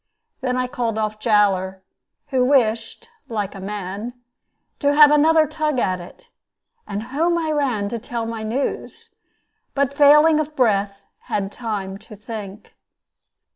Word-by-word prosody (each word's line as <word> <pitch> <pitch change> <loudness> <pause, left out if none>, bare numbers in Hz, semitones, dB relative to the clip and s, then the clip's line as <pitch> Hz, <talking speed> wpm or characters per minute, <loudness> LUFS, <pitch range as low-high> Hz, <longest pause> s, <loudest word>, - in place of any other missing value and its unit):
Then 255 -1 -1
I 255 - 0
called 235 -3 -3
off 215 0 -2
Jowler, 195 -4 +1 0.5
who 260 -3 +2
wished 245 -4 +1 0.2
(like 210 -4 -3
a 195 - -9
man) 205 +4 -5 0.6
to 285 -1 +2
have 295 -1 +8
another 310 +1 +5
tug 305 -1 -2
at 185 -6 0
it; 175 - -13 0.6
and 205 +1 -4
home 325 +8 0
I 320 -2 -1
ran 255 -9 0
to 235 +1 -4
tell 235 0 -4
my 225 -1 -5
news, 230 +6 -4 0.6
but 280 0 0
failing 300 +2 +6
of 310 0 -3
breath, 200 -5 +1 0.2
had 195 -1 -2
time 200 -5 -5
to 215 0 -12
think. 210 -1 -9
230 Hz, 140 wpm, -21 LUFS, 205-280 Hz, 0.6 s, have